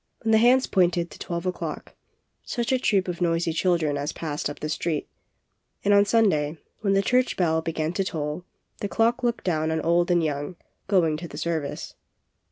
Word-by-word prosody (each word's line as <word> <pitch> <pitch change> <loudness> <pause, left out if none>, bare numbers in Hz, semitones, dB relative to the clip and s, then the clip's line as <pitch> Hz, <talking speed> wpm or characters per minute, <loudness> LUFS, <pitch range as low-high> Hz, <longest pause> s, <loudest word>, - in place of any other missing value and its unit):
When 225 - +1
the 220 - +6
hands 255 +3 +5
pointed 175 -2 +1
to - - -12
twelve 170 +1 -4
o'clock, 185 - -4 0.5
such 235 -1 -2
a 260 - +3
troop 195 -6 +2
of 180 0 -4
noisy 165 -1 +1
chil 175 +1 +2
dren 150 -3 -1
as 145 +2 -3
passed 150 -3 -3
up 145 - -8
the 155 - -3
street 155 0 -2 0.8
And 205 - +4
on 200 0 +6
Sun 225 +1 +4
day 150 -1 -1 0.2
when 195 -2 +1
the 195 0 +3
church 250 +4 +2
bell 160 -3 +2
began 160 0 -2
to 195 - 0
toll, 155 -1 -3 0.4
the 205 - -3
clock 235 +3 +2
looked 240 -1 -1
down 160 -3 0
on 160 0 0
old 170 +2 +2
and 175 -1 +3
young, 145 +3 -2 0.3
going 170 -6 +2
to 170 +2 -7
the 145 - -10
service. 160 -3 -3
175 Hz, 200 wpm, -25 LUFS, 160-200 Hz, 0.8 s, the